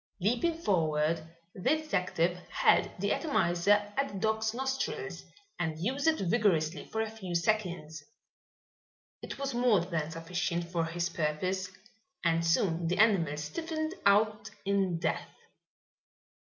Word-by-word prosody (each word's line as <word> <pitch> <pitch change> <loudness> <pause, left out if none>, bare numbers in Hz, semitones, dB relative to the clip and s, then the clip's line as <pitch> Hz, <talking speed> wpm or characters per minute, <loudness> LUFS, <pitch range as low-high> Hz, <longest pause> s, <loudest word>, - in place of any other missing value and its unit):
Leaping 245 - +1
forward, 160 - +1 0.3
the 185 - -10 0.2
detective 180 - 0
held - - +3
the 200 +2 0
atomizer 205 - +2
at 275 0 +1
the 200 - -6
dog's 220 +1 +1
nostrils 265 +3 -3 0.3
and 160 -3 -1
used 260 - -1
it 320 -1 +4
vigorously 180 -5 +1
for 220 - -2
a 220 -1 -2
few 190 -6 -6
seconds. 170 -5 -1 1.2
It - - -7
was 275 -1 -3
more 240 -6 +4
than 165 -3 -2
sufficient 170 +1 -2
for 170 -2 0
his 170 +1 -2
purpose 175 +4 -1 0.6
and 165 0 +3
soon 165 0 +1
the 180 +3 0
animal 190 -9 +3
stiffened 315 - -3
out 210 +1 +3 0.2
in 195 -3 +1
death. - - -2
185 Hz, 130 wpm, -31 LUFS, 165-220 Hz, 1.2 s, it